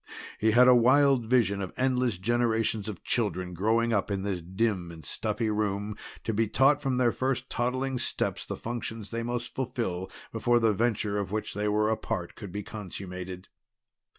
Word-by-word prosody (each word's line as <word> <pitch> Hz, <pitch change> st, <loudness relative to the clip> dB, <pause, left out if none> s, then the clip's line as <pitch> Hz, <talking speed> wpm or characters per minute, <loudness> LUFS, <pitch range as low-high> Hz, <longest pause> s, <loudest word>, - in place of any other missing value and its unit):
He 110 Hz, -, +3 dB
had 125 Hz, +3 st, +6 dB
a 125 Hz, -, +9 dB
wild 130 Hz, 0 st, +5 dB
vision 110 Hz, -5 st, +2 dB
of 95 Hz, -, -4 dB
endless 125 Hz, -5 st, +1 dB
generations 110 Hz, 0 st, +1 dB
of 100 Hz, -5 st, -7 dB
children 95 Hz, -6 st, 0 dB
growing 115 Hz, +5 st, +2 dB
up 100 Hz, -2 st, +1 dB
in 100 Hz, -1 st, -2 dB
this 95 Hz, -3 st, -2 dB
dim 95 Hz, 0 st, -1 dB
and 80 Hz, -3 st, -11 dB
stuffy 110 Hz, +5 st, -1 dB
room, 105 Hz, 0 st, -1 dB, 0.3 s
to 115 Hz, -, -1 dB
be 110 Hz, +1 st, +2 dB
taught 135 Hz, +6 st, +4 dB
from 135 Hz, -2 st, 0 dB
their 125 Hz, -2 st, +3 dB
first 130 Hz, +1 st, -2 dB
toddling 130 Hz, +2 st, -1 dB
steps -, -, -1 dB
the -, -, -5 dB
functions 115 Hz, -2 st, -5 dB
they 115 Hz, 0 st, -2 dB
must 120 Hz, 0 st, -3 dB
fulfill 115 Hz, -8 st, -3 dB, 0.2 s
before 120 Hz, 0 st, +2 dB
the 115 Hz, -2 st, +3 dB
venture 105 Hz, -2 st, 0 dB
of 100 Hz, -2 st, -3 dB
which 110 Hz, 0 st, -3 dB
they 105 Hz, +1 st, -1 dB
were 105 Hz, +1 st, +2 dB
a 110 Hz, -, +1 dB
part 90 Hz, -7 st, -4 dB
could 100 Hz, -4 st, -9 dB
be 105 Hz, +3 st, -4 dB
consummated. 90 Hz, -3 st, -7 dB
110 Hz, 180 wpm, -28 LUFS, 100-120 Hz, 0.3 s, a